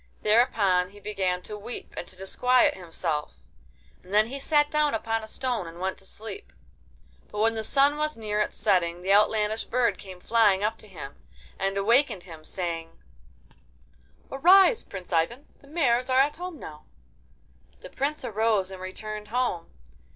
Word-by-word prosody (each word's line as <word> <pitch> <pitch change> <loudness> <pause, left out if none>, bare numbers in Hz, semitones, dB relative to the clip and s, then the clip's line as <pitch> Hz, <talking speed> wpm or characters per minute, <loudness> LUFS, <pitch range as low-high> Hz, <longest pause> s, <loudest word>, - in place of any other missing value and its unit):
Thereupon 205 -5 +3
he 205 +1 -15
began 190 -3 -2
to 210 - -7
weep 210 +4 -8
and - - -6
to - - -12
disquiet 250 +7 +3
himself, 165 -4 -4 0.7
and 185 - -15
then 215 +2 +4
he 275 +2 -5
sat 295 +1 +2
down 300 -4 +2
upon 225 0 -2
a - - -8
stone 240 -5 -2
and 165 +1 -10
went 190 +1 -3
to 195 - -14
sleep. 225 - -9 0.8
But - - -9
when 225 +2 +3
the 220 -1 -3
sun 280 +5 +3
was 305 -2 -1
near 210 -1 -2
its 210 - -1
setting 180 -4 +1
the 195 +1 +3
outlandish 215 +1 +2
bird 235 -5 +1
came 185 -2 -10
flying 205 -2 +3
up 220 +1 -1
to 215 - -13
him, 155 -8 -9 0.4
and 195 0 -1
awakened 225 -1 +2
him, 160 -4 -12
saying: 165 -1 -5 1.3
'Arise, 375 - +6
Prince 185 -2 -9
Ivan! 200 - 0 0.2
The 280 - -18
mares 265 -5 +1
are 255 0 +4
at 285 +3 +2
home 360 -1 -6
now.' 150 -1 -10 1.0
The - - -11
Prince 290 +3 -2
arose 215 -3 +1
and 190 -1 -9
returned 210 +3 -6
home. 235 -8 -1
210 Hz, 165 wpm, -26 LUFS, 185-250 Hz, 1.3 s, Arise